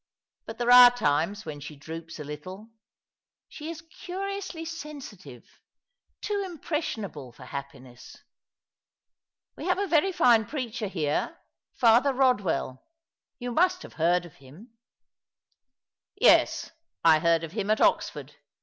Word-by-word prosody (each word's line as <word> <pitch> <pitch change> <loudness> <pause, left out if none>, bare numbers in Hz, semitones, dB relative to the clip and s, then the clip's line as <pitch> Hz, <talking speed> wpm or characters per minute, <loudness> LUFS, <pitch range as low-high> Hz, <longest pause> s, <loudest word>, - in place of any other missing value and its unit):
But 225 - -7
there 245 0 +1
are 245 0 +11
times 200 -2 -1
when 150 -2 -7
she 150 +1 -9
droops 160 +3 -9
a 150 - -6
little. 185 +9 -9 0.8
She 305 +1 -8
is 320 -1 -8
curiously 370 0 -6
sensitive 275 - -9 0.4
— - - -52
too 410 -1 -1
impression 310 - -4
able 140 -9 -10
for 125 - -14
happiness. 130 -2 -10 1.4
We - - -8
have 365 - +2
a 400 - 0
very 350 +1 +2
fine 235 - +4
preacher 240 -6 -4
here 155 -6 -2 0.2
— - - -66
Father 245 +4 +5
Eodwell; 205 - 0 0.6
you 245 -1 -5
must 365 +7 +2
have - - -12
heard 175 +1 +2
him." 160 - -16 0.7
" - - -54
Yes, - - +4 0.3
I 160 -2 +6
heard 165 0 +2
of 165 - -6
him 205 +1 -3
at 215 - +2
Oxford. - - 0
220 Hz, 135 wpm, -27 LUFS, -, 1.4 s, are